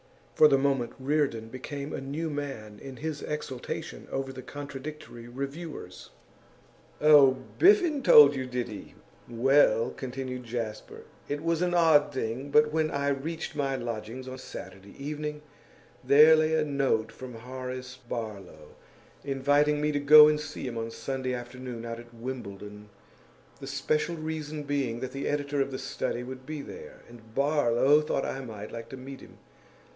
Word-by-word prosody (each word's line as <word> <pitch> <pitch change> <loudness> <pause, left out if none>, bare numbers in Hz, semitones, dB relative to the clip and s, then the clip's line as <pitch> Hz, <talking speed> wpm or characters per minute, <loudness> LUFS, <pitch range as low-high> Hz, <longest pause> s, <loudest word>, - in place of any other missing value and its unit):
For 155 - +7
the 135 - +4
moment, 135 -3 0
Reardon 130 -5 0
became 140 +4 -6
a - - -4
new 145 +5 -3
man 135 -8 -6
in 135 -1 -8
his 155 +1 -5
exultation 145 -4 -5
over 135 0 -3
the 130 - -8
contradictory 140 -3 -8
reviewers. 140 - -7 0.9
'Oh, 145 -3 +7 0.2
Biffen 350 -6 +5
told 145 - +8
you, 130 -1 -3
did 125 -1 -2
he? 105 -4 -10 0.3
Well,' 120 -1 +3
continued 130 -1 -6
Jasper, 115 -2 -5 0.3
'it 145 +1 -3
was 165 0 0
an 175 -1 +1
odd 160 -4 +5
thing, 130 +1 -3
but 150 +1 +4
when 155 -1 +1
I 140 -1 -1
reached 155 +4 -3
my 135 -2 0
lodgings 120 +1 -5
on 130 0 -7
Saturday 100 -5 -10
evening 150 +1 -5 0.6
there 150 +5 +8
lay 155 0 +2
a 155 -1 +2
note 135 -6 0
from 130 -2 -9
Horace 130 +2 -7
Barlow, 100 -9 -6 0.5
inviting 145 +2 +2
me 150 0 +1
to 145 - 0
go 150 +1 +9
and 150 0 +2
see 150 -2 -6
him 120 -2 -4
on 115 0 -3
Sunday 130 +1 -3
afternoon 120 -1 -7
out 115 0 -5
at 120 0 -13
Wimbledon, 105 -4 -7 0.7
the - - -8
special 155 +2 -1
reason 155 -1 -5
being 140 -5 -1
that 130 -1 -4
the 135 +1 -4
editor 145 -1 -1
of 135 - 0
The 130 - -5
Study 120 - -3
would 130 +1 -9
be 155 -2 -5
there, 475 +2 -11
and 115 -1 -16
Barlow 140 0 +3
thought 150 -2 -1
I 135 - -3
might 110 -3 -8
like 115 0 -7
to 135 - -8
meet 135 +1 -9
him. - - -15
135 Hz, 160 wpm, -28 LUFS, 120-150 Hz, 0.9 s, go